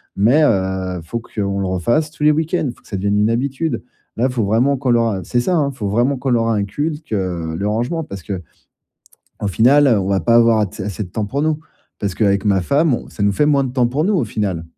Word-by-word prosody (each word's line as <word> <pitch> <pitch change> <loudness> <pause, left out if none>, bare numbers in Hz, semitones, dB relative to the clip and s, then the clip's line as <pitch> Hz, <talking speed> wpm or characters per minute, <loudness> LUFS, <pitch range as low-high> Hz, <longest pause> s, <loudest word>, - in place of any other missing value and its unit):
Mais, 125 +10 +4
heu, 95 -5 0
faut 115 +8 -4
qu'on 100 -4 -3
le 95 - -1
refasse 120 - 0
tous 150 - -7
les 150 - +6
week-ends, 160 -1 0
faut - - -24
que - - -22
ça 100 - -4
devienne 100 +2 0
une 105 +1 +3
habitude. 140 +6 -2 0.3
Là, 125 +3 +2
faut 125 -4 -1
vraiment 115 +8 +2
qu'on 130 0 -2
leur, 115 -1 +3
heu 95 - -4
c'est 120 - 0
ça, 180 +9 +1
hein, 145 -3 +1
faut 115 -7 -5
vraiment 120 +6 +1
qu'on 130 +2 -3
leur 115 -1 +2
inculque, 145 +8 -2
heu, 85 -5 -2
le 100 +4 -2
rangement 120 +10 -1
parce 100 -9 -8
qu'au 90 -5 -8 0.9
final, 135 +9 +4
heu, 115 -5 +4
on 95 - -3
va 100 -1 +1
pas 115 0 +3
avoir 115 -1 +5
att 105 -3 -3
assez 100 +1 -4
de - - -11
temps 110 +2 -2
pour 140 +8 -2
nous, 155 -1 +1 0.4
parce 100 -3 -2
qu'avec 100 -1 +1
ma 100 -2 +3
femme, 140 - +2
ça - - -5
nous 100 0 +3
fait 145 +9 +2
moins 140 -2 +3
de 130 - -4
temps 125 -2 +2
pour 140 +6 -1
nous, 205 +3 +1
au 160 -10 +1
final. 100 -6 -3
115 Hz, 245 wpm, -19 LUFS, 100-140 Hz, 0.9 s, les